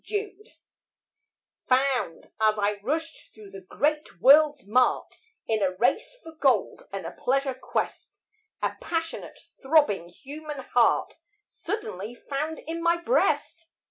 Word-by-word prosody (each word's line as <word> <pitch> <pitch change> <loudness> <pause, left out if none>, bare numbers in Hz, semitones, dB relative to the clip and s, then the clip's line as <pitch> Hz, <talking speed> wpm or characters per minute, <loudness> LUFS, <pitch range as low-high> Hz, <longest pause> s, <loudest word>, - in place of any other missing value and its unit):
FOUND 415 +1 -5 1.1
Found 255 -8 +1 0.2
as 215 0 +4
I 205 0 0
rushed 320 +8 -4
through 210 -2 -13
the 195 0 -9
great 300 +10 -1
world's 290 -1 +6
mart, 250 +5 +1 0.3
In 220 -1 0
a 185 -2 +1
race 245 - 0
for 325 - -10
gold 270 -9 +1
and 195 -3 -5
a 165 - -5
pleasure 270 +4 0
quest, 260 - -4 0.4
A - - -1
passionate, 330 -1 -4 0.2
throbbing 265 - +3
human 290 - -8
heart 245 +4 +2 0.3
Suddenly 230 - -5
found 300 +5 -4
in 330 +1 -4
my 340 0 +3
breast. 340 -5 0
275 Hz, 125 wpm, -26 LUFS, 215-320 Hz, 1.1 s, world's